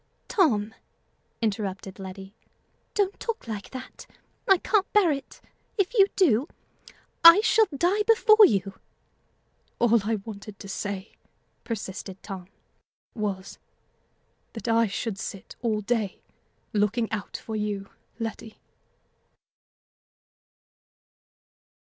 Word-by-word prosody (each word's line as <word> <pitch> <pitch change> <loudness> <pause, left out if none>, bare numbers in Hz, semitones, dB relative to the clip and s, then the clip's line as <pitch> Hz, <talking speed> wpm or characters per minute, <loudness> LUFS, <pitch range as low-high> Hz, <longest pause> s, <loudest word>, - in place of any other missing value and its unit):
"Tom!" 220 - +2 0.7
interrupted 195 -3 -3
Letty, 190 +1 -8 0.6
"don't 405 -1 0
talk 460 - -4
like 210 -3 -5
that; 255 -1 -9 0.4
I 385 - +7
can't 405 +2 +1
bear 405 -6 +5
it. 275 -1 -6 0.4
If 395 +2 +1
you 395 -5 +6
do, 285 - +3 0.8
I 335 +3 +11
shall 440 0 +4
die 355 +7 +1
before 445 -1 +7
you." 195 - -2 1.0
"All 235 -1 +4
I 225 +2 0
wanted 210 -2 -9
to - - -10
say," 200 +1 -5 0.5
persisted 195 -3 -6
Tom, 190 -3 -7 0.7
"was, 200 -4 -4 0.9
that 225 - -7
I 230 0 +3
should 200 0 -4
sit 195 - -7
all 220 -3 0
day 210 -2 -1 0.5
looking 215 +2 +1
out 210 -3 -4
for 220 - -7
you, 205 -2 -2 0.3
Letty." 225 -1 -6
225 Hz, 105 wpm, -26 LUFS, 200-335 Hz, 1.0 s, I